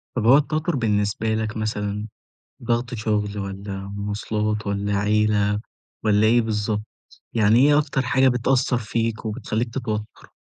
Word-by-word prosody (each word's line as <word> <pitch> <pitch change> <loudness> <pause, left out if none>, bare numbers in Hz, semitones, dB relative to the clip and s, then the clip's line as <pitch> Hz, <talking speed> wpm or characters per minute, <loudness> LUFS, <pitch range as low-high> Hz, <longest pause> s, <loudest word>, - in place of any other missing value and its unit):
طب 115 - -1
هو 130 +5 +8
التوتر 155 +2 0
بالنسبة 110 -2 0
لك 110 0 -3
مثلًا، 105 -1 -2 0.6
ضغط 120 +1 -1
شغل 105 -2 -1
والّا 100 0 -5 0.2
مواصلات 105 +1 -2
والّا 100 0 -1
عيلة 105 0 +2 0.4
والّا 105 0 +4
إيه 120 +2 +5
بالضبط، 105 -1 -1 0.5
يعني 110 +1 +4
إيه 145 0 +5
أكتر 145 -2 0
حاجة 130 +1 +3
بتأثر 125 0 +1
فيك 115 0 -2
وبتخليك 110 +1 -3
تتوتر؟ 110 -4 -5
110 Hz, 130 wpm, -23 LUFS, 105-120 Hz, 0.6 s, هو